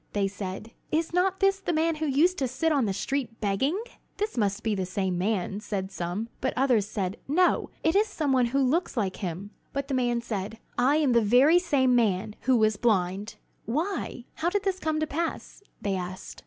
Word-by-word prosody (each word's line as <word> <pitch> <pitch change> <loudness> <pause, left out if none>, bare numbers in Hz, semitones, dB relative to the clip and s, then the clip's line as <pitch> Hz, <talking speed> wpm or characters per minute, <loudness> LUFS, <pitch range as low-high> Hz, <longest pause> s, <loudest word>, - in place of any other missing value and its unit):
They 200 -1 +1
said: 195 +2 -6 0.2
"Is 325 +1 0
not 375 +2 +1
this 390 0 +3
the 390 - -2
man 320 0 +1
who 310 0 -1
used 330 +7 +3
to 265 - +1
sit 320 +6 0
on 280 -5 +2
the - - 0
street 230 +3 -3
begging?" 235 - 0 0.4
"This 420 +1 -2
must 205 -2 0
be 220 - +1
the 190 -2 -1
same 190 -1 -1
man," 195 +1 -1
said 195 -2 -4
some; 185 +4 -3
but 260 - -1
others 245 -6 +3
said: 195 -2 -3
"No, 355 +6 +2
it 320 - +2
is 420 +2 +4
some 310 -9 -1
one 250 -2 +3
who 275 +3 +1
looks 300 +3 0
like 195 -4 -1
him." 185 +2 -5 0.2
But 280 0 -3
the - - -1
man 240 -2 +1
said, 220 -2 -4 0.2
"I 265 +4 +3
am 300 -4 +3
the 235 -1 +5
very 255 +11 +5
same 280 -8 +2
man 210 -3 +1
who 255 - +6
was 215 -1 +3
blind!" 200 -2 0 0.3
"Why, 310 - -2
how 330 +2 0
did 410 +2 -1
this 385 -1 -1
come 315 -2 -1
to - - +2
pass?" 330 +6 -4 0.2
they 200 -1 -1
asked. 185 0 -6
245 Hz, 210 wpm, -27 LUFS, 200-310 Hz, 0.4 s, who